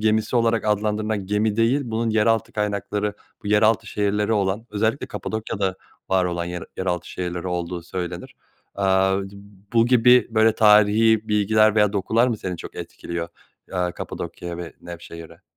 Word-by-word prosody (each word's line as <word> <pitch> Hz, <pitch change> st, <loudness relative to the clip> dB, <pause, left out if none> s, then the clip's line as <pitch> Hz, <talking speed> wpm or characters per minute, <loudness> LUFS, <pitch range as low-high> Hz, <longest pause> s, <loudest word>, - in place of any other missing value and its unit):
gemisi 110 Hz, +2 st, +1 dB
olarak 115 Hz, -1 st, +2 dB
adlandırılan 105 Hz, -1 st, -1 dB
gemi 105 Hz, +1 st, 0 dB
değil 115 Hz, +5 st, +3 dB
bunun 115 Hz, -1 st, -1 dB
yeraltı 110 Hz, +1 st, +1 dB
kaynakları, 105 Hz, 0 st, -2 dB, 0.3 s
bu -, -, -3 dB
yeraltı 110 Hz, +2 st, +3 dB
şehirleri 105 Hz, +1 st, 0 dB
olan, 100 Hz, +1 st, 0 dB
özellikle 110 Hz, +5 st, -1 dB
Kapadokya'da 100 Hz, -3 st, -3 dB, 0.3 s
var 95 Hz, -1 st, +2 dB
olan 85 Hz, -1 st, -2 dB
yer 90 Hz, 0 st, -5 dB
yeraltı 90 Hz, -2 st, -2 dB
şehirleri 90 Hz, 0 st, -4 dB
olduğu 90 Hz, 0 st, -3 dB
söylenir. 90 Hz, 0 st, -6 dB, 0.4 s
Aaa, 95 Hz, 0 st, +2 dB
d 95 Hz, 0 st, -9 dB, 0.4 s
bu 115 Hz, 0 st, +4 dB
gibi 125 Hz, 0 st, +5 dB
böyle 110 Hz, 0 st, +3 dB
tarihi 110 Hz, +1 st, +4 dB
bilgiler 110 Hz, +1 st, +3 dB
veya 105 Hz, -2 st, +3 dB
dokular 110 Hz, +4 st, +2 dB
mı 115 Hz, -, -1 dB
seni 90 Hz, -3 st, -5 dB
çok -, -, -9 dB
etkiliyor, 85 Hz, -1 st, -6 dB, 0.4 s
aaa, 90 Hz, -1 st, -1 dB
Kapadokya 85 Hz, 0 st, -6 dB
ve 85 Hz, -1 st, -7 dB
Nevşehir'e? 85 Hz, -1 st, -10 dB
105 Hz, 145 wpm, -23 LUFS, 95-110 Hz, 0.4 s, gibi